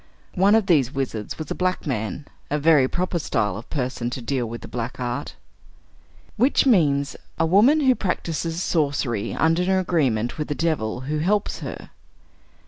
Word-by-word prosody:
One 195 Hz, +3 st, +4 dB
of 225 Hz, -3 st, +3 dB
these 145 Hz, -, +3 dB
wizards 125 Hz, -6 st, -4 dB
was 155 Hz, -2 st, -6 dB
a -, -, +2 dB
black 185 Hz, 0 st, -1 dB
man; 125 Hz, +1 st, -3 dB, 0.2 s
a 150 Hz, -, 0 dB
very 150 Hz, -3 st, +4 dB
proper 180 Hz, +3 st, -1 dB
style 105 Hz, -, -1 dB
of 110 Hz, +4 st, -9 dB
person 125 Hz, -4 st, -2 dB
to 130 Hz, -, -5 dB
deal 125 Hz, -1 st, -2 dB
with 115 Hz, +1 st, -7 dB
the -, -, -9 dB
black 120 Hz, +1 st, -5 dB
art. 120 Hz, 0 st, -4 dB, 1.0 s
Witch 260 Hz, +5 st, +4 dB
means, 145 Hz, -, +3 dB, 0.2 s
a 165 Hz, -, +2 dB
woman 220 Hz, -, +5 dB
who 260 Hz, -2 st, +5 dB
practices 170 Hz, -4 st, -2 dB
sorcery 135 Hz, -, -1 dB
under 165 Hz, +2 st, +2 dB
an 180 Hz, -, 0 dB
agreement 155 Hz, -, +1 dB
with 150 Hz, -, -2 dB
the 145 Hz, -, -2 dB
devil, 130 Hz, -9 st, -1 dB
who 150 Hz, +3 st, -2 dB
helps 200 Hz, +6 st, 0 dB
her. -, -, -8 dB
150 Hz, 170 wpm, -23 LUFS, 125-180 Hz, 1.0 s, woman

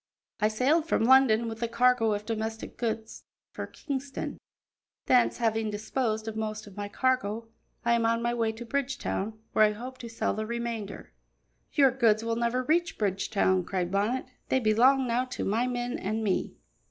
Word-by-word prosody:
"I 210 Hz, -, +3 dB
sailed 275 Hz, +9 st, +2 dB
from 225 Hz, -, +2 dB
London 235 Hz, -2 st, +5 dB
with 225 Hz, 0 st, -6 dB
a 235 Hz, -, +1 dB
cargo 235 Hz, -1 st, +3 dB
of 205 Hz, 0 st, -4 dB
domestic 220 Hz, 0 st, -4 dB
goods 220 Hz, -2 st, -4 dB, 0.3 s
for -, -, -5 dB
Kingston; 275 Hz, -2 st, -5 dB, 0.7 s
thence, 250 Hz, -2 st, +4 dB
having 225 Hz, -2 st, 0 dB
disposed 220 Hz, +1 st, -2 dB
of 220 Hz, -, -4 dB
most 215 Hz, -1 st, -3 dB
of 200 Hz, -2 st, -13 dB
my 205 Hz, 0 st, -5 dB
cargo, 230 Hz, -3 st, 0 dB, 0.4 s
I 235 Hz, -, +4 dB
am 235 Hz, -1 st, +2 dB
on 230 Hz, 0 st, +2 dB
my 240 Hz, 0 st, +1 dB
way 230 Hz, -2 st, +1 dB
to 235 Hz, +2 st, -8 dB
Bridgetown, 250 Hz, -5 st, -2 dB, 0.2 s
where 215 Hz, -, +5 dB
I 210 Hz, 0 st, +4 dB
hope 255 Hz, +4 st, -8 dB
to 235 Hz, -, -7 dB
sell 225 Hz, -, -1 dB
the 215 Hz, 0 st, -3 dB
remainder." 235 Hz, -3 st, -5 dB, 0.6 s
"Your 275 Hz, -3 st, +5 dB
goods 230 Hz, -4 st, +3 dB
will 230 Hz, 0 st, -1 dB
never 235 Hz, +2 st, 0 dB
reach 340 Hz, +5 st, +1 dB
Bridgetown," 195 Hz, -2 st, +1 dB
cried 180 Hz, 0 st, -2 dB
Bonnet; 210 Hz, +6 st, 0 dB, 0.2 s
"they 260 Hz, -, +3 dB
belong 255 Hz, +4 st, +4 dB
now 240 Hz, +1 st, +1 dB
to 255 Hz, -, -4 dB
my 225 Hz, +5 st, +1 dB
men 245 Hz, +3 st, -2 dB
and 225 Hz, -10 st, -2 dB
me." 195 Hz, -3 st, -1 dB
230 Hz, 175 wpm, -28 LUFS, 215-250 Hz, 0.7 s, London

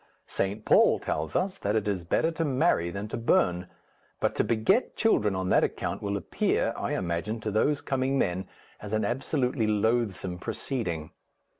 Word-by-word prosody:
St. 100 Hz, +2 st, -2 dB
Paul -, -, +5 dB
tells 75 Hz, 0 st, -3 dB
us 190 Hz, +1 st, 0 dB
that 105 Hz, +2 st, -1 dB
it 105 Hz, -2 st, 0 dB
is 95 Hz, -4 st, -1 dB
better 160 Hz, -, +1 dB
to 165 Hz, 0 st, -2 dB
marry 135 Hz, -, +2 dB
than 100 Hz, +4 st, -5 dB
to -, -, -3 dB
burn, 90 Hz, -6 st, +2 dB, 0.5 s
but -, -, +1 dB
to -, -, +1 dB
beget 120 Hz, -, +1 dB
children 105 Hz, -, +2 dB
on 95 Hz, 0 st, -2 dB
that -, -, +4 dB
account -, -, -2 dB
will 100 Hz, 0 st, -1 dB
appear, -, -, 0 dB
I -, -, -3 dB
imagine, 90 Hz, +6 st, -2 dB
to 105 Hz, -, -2 dB
these 145 Hz, +8 st, +1 dB
coming 135 Hz, 0 st, 0 dB
men 90 Hz, -5 st, -1 dB, 0.3 s
as 105 Hz, 0 st, -7 dB
an 110 Hz, -, +1 dB
absolutely 125 Hz, -1 st, 0 dB
loathsome 105 Hz, -4 st, 0 dB
proceeding. 90 Hz, -, -3 dB
110 Hz, 170 wpm, -28 LUFS, 95-130 Hz, 0.5 s, Paul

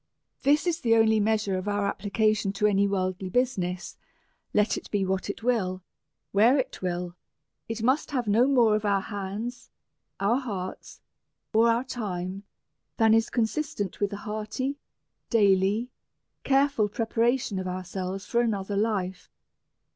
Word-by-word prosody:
This 290 Hz, +4 st, +3 dB
is 345 Hz, -2 st, 0 dB
the 230 Hz, -1 st, +4 dB
only 220 Hz, -1 st, +4 dB
measure 210 Hz, -3 st, +1 dB
of 185 Hz, -, -7 dB
our 205 Hz, 0 st, 0 dB
application 205 Hz, +1 st, 0 dB
to 205 Hz, +1 st, 0 dB
any 200 Hz, -1 st, +3 dB
worldly 185 Hz, -1 st, -2 dB
business; 185 Hz, -7 st, -1 dB, 0.5 s
let 210 Hz, +1 st, +2 dB
it -, -, -7 dB
be 200 Hz, -2 st, 0 dB
what 190 Hz, +1 st, -2 dB
it 210 Hz, -, -5 dB
will, 190 Hz, -7 st, 0 dB, 0.5 s
where 225 Hz, +7 st, +5 dB
it 260 Hz, -, -3 dB
will, 175 Hz, -1 st, -3 dB, 0.5 s
it 225 Hz, 0 st, -4 dB
must 260 Hz, +6 st, +2 dB
have 255 Hz, -6 st, -2 dB
no 225 Hz, +5 st, +4 dB
more 240 Hz, -6 st, +4 dB
of 215 Hz, -, -1 dB
our 200 Hz, -2 st, +2 dB
hands, 205 Hz, +5 st, -5 dB, 0.5 s
our 215 Hz, +6 st, +2 dB
hearts, 200 Hz, -8 st, -6 dB, 0.5 s
or 225 Hz, +2 st, +5 dB
our 230 Hz, +2 st, +2 dB
time, 195 Hz, -7 st, -4 dB, 0.6 s
than 225 Hz, -1 st, +5 dB
is 225 Hz, 0 st, +3 dB
consistent 230 Hz, -3 st, -2 dB
with 205 Hz, 0 st, 0 dB
an 200 Hz, -, -4 dB
hearty, 215 Hz, +7 st, -4 dB, 0.5 s
daily, 205 Hz, +2 st, +3 dB, 0.5 s
careful 275 Hz, -6 st, +2 dB
preparation 230 Hz, -1 st, 0 dB
of 185 Hz, -, -4 dB
ourselves 185 Hz, +1 st, -4 dB
foi 235 Hz, -, 0 dB
another 205 Hz, -4 st, -1 dB
life. 200 Hz, -3 st, -1 dB
210 Hz, 145 wpm, -27 LUFS, 195-235 Hz, 0.6 s, where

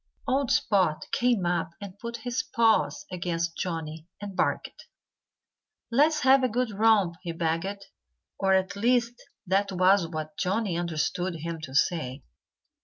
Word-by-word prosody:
Old 265 Hz, -1 st, +1 dB
Spot 185 Hz, -7 st, +2 dB
came 240 Hz, -6 st, +2 dB
up 175 Hz, 0 st, -1 dB
and 200 Hz, -3 st, -8 dB
put 235 Hz, 0 st, -5 dB
his 245 Hz, +3 st, 0 dB
paws 230 Hz, +1 st, +1 dB
against 170 Hz, -2 st, -2 dB
Johnnie 160 Hz, -2 st, -4 dB
and 200 Hz, -2 st, -7 dB
barked. -, -, -2 dB, 1.0 s
"Let's 300 Hz, +5 st, +3 dB
have 265 Hz, 0 st, +5 dB
a 255 Hz, -, +2 dB
good 245 Hz, 0 st, -1 dB
romp!" 205 Hz, -5 st, +3 dB
he 175 Hz, -, -4 dB
begged. 170 Hz, +5 st, -2 dB, 0.5 s
Or 190 Hz, -1 st, +3 dB
at 190 Hz, +1 st, 0 dB
least 240 Hz, +2 st, +1 dB, 0.2 s
that 195 Hz, +2 st, +1 dB
was 185 Hz, 0 st, +4 dB
what 155 Hz, -2 st, -6 dB
Johnnie 195 Hz, 0 st, 0 dB
understood 170 Hz, +1 st, -1 dB
him 165 Hz, 0 st, -5 dB
to 135 Hz, -4 st, -8 dB
say. 140 Hz, -4 st, 0 dB
190 Hz, 140 wpm, -27 LUFS, 170-225 Hz, 1.0 s, have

